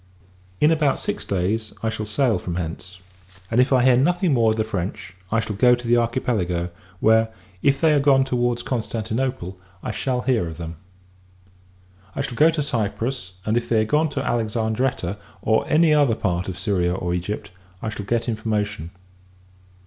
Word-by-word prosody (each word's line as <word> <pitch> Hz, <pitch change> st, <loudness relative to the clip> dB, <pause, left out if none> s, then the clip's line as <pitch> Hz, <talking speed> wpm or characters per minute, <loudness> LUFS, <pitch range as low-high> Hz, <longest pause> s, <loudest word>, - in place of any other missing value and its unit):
In 150 Hz, -, +5 dB
about 150 Hz, -4 st, +2 dB
six -, -, -3 dB
days, 100 Hz, +4 st, -1 dB
I 110 Hz, -, +1 dB
shall 110 Hz, -1 st, -4 dB
sail 115 Hz, -2 st, +1 dB
from 90 Hz, -1 st, -4 dB
hence: 90 Hz, +2 st, -5 dB, 0.5 s
and, 120 Hz, +2 st, +4 dB
if 130 Hz, -, +1 dB
I 130 Hz, -2 st, +4 dB
hear 130 Hz, -1 st, +6 dB
nothing 175 Hz, +4 st, +2 dB
more 115 Hz, -3 st, +4 dB
of 110 Hz, -, 0 dB
the 110 Hz, -, +2 dB
French, 95 Hz, -3 st, -4 dB, 0.2 s
I 115 Hz, -, +3 dB
shall 110 Hz, -1 st, -3 dB
go 125 Hz, +4 st, +5 dB
to 120 Hz, -1 st, -8 dB
the 120 Hz, -, +4 dB
Archipelago; 110 Hz, -8 st, 0 dB, 0.3 s
where, 110 Hz, 0 st, +4 dB, 0.3 s
if 140 Hz, 0 st, +3 dB
they 160 Hz, 0 st, +4 dB
are 145 Hz, -, +4 dB
gone 135 Hz, -1 st, +4 dB
towards 120 Hz, -2 st, 0 dB
Constantinople, 115 Hz, -4 st, -3 dB, 0.2 s
I -, -, -2 dB
shall 125 Hz, +2 st, -1 dB
hear 125 Hz, -9 st, +1 dB
of 80 Hz, -1 st, -7 dB
them. 85 Hz, -1 st, -7 dB, 1.4 s
I 140 Hz, -, -1 dB
shall 135 Hz, -, -4 dB
go 155 Hz, +7 st, +5 dB
to 160 Hz, -2 st, 0 dB
Cyprus; 115 Hz, -3 st, -2 dB
and, 110 Hz, -, +1 dB
if 120 Hz, -, -1 dB
they 110 Hz, -2 st, +3 dB
are -, -, -2 dB
gone 150 Hz, +6 st, +2 dB
to -, -, -3 dB
Alexandretta, 110 Hz, -3 st, -1 dB, 0.3 s
or 110 Hz, -, +2 dB
any 160 Hz, 0 st, +4 dB
other 145 Hz, -6 st, +4 dB
part 90 Hz, -4 st, -1 dB
of 95 Hz, -, -4 dB
Syria 90 Hz, -4 st, 0 dB
or 90 Hz, -2 st, -2 dB
Egypt, 90 Hz, +4 st, -4 dB, 0.3 s
I 110 Hz, -, -1 dB
shall 105 Hz, -2 st, -6 dB
get 115 Hz, +1 st, 0 dB
information. 105 Hz, -5 st, -2 dB
115 Hz, 180 wpm, -23 LUFS, 100-130 Hz, 1.4 s, hear